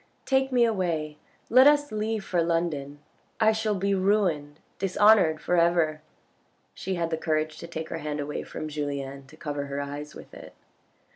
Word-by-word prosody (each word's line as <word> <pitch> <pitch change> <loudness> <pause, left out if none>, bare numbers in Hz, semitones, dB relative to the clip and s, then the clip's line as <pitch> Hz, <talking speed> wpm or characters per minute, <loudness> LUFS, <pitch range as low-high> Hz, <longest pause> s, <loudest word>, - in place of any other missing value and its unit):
Take 265 0 +2
me 245 -2 +4
away, 165 -8 -2 0.3
let 255 +3 +7
us 290 0 +4
leave 215 -1 -2
for 175 -2 +1
London. 160 -4 -2 0.4
I 220 -1 +5
shall 220 -1 -1
be 200 +1 0
ruined, 185 -7 +1 0.2
dishonoured 195 -4 +4
for 175 - 0
ever." 170 -2 +2 0.7
She 190 0 -4
had 170 -1 -2
the 160 - 0
courage 155 -1 -1
to 170 - -8
take 160 -1 -6
her 165 - -4
hand 150 -1 -4
away 145 +1 -3
from 155 - -6
Julien 140 -2 -5
to 155 - -16
cover 145 -3 -4
her 140 0 -4
eyes 145 +1 -6
with - - -12
it. - - -12
165 Hz, 170 wpm, -26 LUFS, 150-205 Hz, 0.7 s, let